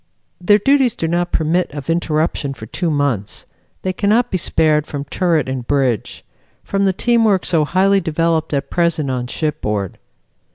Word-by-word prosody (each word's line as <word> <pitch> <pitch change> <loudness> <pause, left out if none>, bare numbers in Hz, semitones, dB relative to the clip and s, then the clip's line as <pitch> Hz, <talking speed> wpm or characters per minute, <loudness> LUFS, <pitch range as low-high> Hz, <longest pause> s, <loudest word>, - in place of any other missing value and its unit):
Their 205 +3 +5
duties 265 +2 +2
do 165 - -2
not 175 +1 -1
permit 165 +3 0
of 145 -2 -7
interruption 155 -4 -1
for 110 - -9
two 170 - -3
months. 140 - -2 0.4
They 185 - -1
cannot 220 +6 +1
be 185 - +1
spared 155 -2 +2
from 140 -1 -5
turret 165 -2 0
and 130 -2 -4
bridge; 130 -6 -1 0.4
from 195 0 0
the 190 - +3
team 235 +4 +1
work 200 -4 +2
so 160 -3 +2
highly 195 +4 +2
developed 165 -1 0
at 140 -1 -2
present 170 -5 +1
on 125 -1 -3
shipboard. 105 - -3
160 Hz, 165 wpm, -18 LUFS, 140-185 Hz, 0.4 s, Their